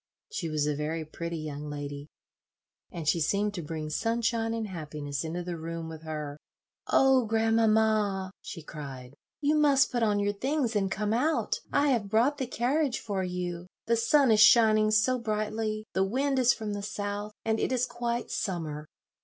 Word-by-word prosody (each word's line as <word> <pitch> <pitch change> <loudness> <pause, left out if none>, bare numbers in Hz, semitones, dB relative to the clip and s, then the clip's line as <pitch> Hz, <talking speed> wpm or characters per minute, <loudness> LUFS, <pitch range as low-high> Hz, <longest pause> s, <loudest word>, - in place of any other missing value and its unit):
She 170 - -3
was 155 -1 0
a 150 - +1
very 155 +2 -3
pretty 170 +2 -5
young 150 -1 -5
lady, 145 0 -6 0.8
and 165 -3 -6
she 170 - +3
seemed 200 +6 +1
to 180 - -4
bring 155 -1 -5
sunshine 230 +4 0
and 225 -1 -2
happiness 150 -5 -5
into 170 +2 -4
the 175 -1 -4
room 165 0 -5
with 160 -1 -8
her. 150 -2 -5 0.5
"Oh, 265 -2 +4
grandmamma!" 220 -3 +2
she 165 - -8
cried, 135 -5 -8 0.3
"you 295 +1 +3
must 285 -3 +4
put 240 - -1
on 210 -2 +2
your 205 0 +1
things 260 +1 -1
and 195 -2 +1
come 210 +2 -1
out. 300 +8 +1
I 285 +1 +3
have 225 -7 +1
brought 250 +8 +2
the 260 - -2
carriage 260 +3 0
for 195 -3 -2
you; 180 -1 -4 0.2
the 230 - +2
sun 245 +3 +4
is 215 - +4
shining 215 -1 +6
so 220 +4 +3
brightly; 215 -1 -2
the 190 - +2
wind 265 +7 0
is 250 -1 +5
from 215 -3 -3
the 205 - -4
south, 205 +1 -4
and 220 0 +1
it - - 0
is 250 -1 +2
quite 240 -1 -3
summer. 155 -6 -3
210 Hz, 180 wpm, -29 LUFS, 165-230 Hz, 0.8 s, shining